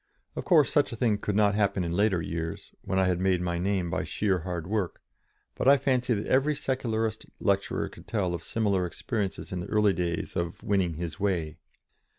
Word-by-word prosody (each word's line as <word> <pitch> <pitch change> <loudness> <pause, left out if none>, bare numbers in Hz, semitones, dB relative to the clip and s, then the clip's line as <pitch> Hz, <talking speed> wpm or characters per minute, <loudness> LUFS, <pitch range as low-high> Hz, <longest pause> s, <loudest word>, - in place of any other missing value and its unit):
Of - - -4
course 160 -7 +5
such 145 -2 +3
a - - -4
thing 110 -3 +1
could 105 -1 -2
not 105 -1 +4
happen 100 -3 +1
in 85 - -2
later 95 -1 +2
years, 80 0 -5
when 95 - -2
I 95 - +4
had 90 -1 +1
made 95 -1 +2
my 85 -1 -1
name 90 -2 0
by - - -1
sheer 95 -3 0
hard 85 -1 -4
work, 100 -2 -2 0.5
but - - -2
I 140 +1 +8
fancy 125 -3 +1
that 100 - -3
every 140 +3 +2
Secularist 115 -5 -2
lecturer 100 -1 0
could - - -14
tell 95 -6 0
of 85 - -3
similar 100 -1 0
experiences 105 +1 -4
in 90 - -2
the 90 - -5
early 105 -2 +3
days 85 -2 -2
of 85 -2 -3
"winning 95 -5 +1
his 80 -1 -5
way." 85 -5 -1
100 Hz, 200 wpm, -28 LUFS, 90-110 Hz, 0.5 s, I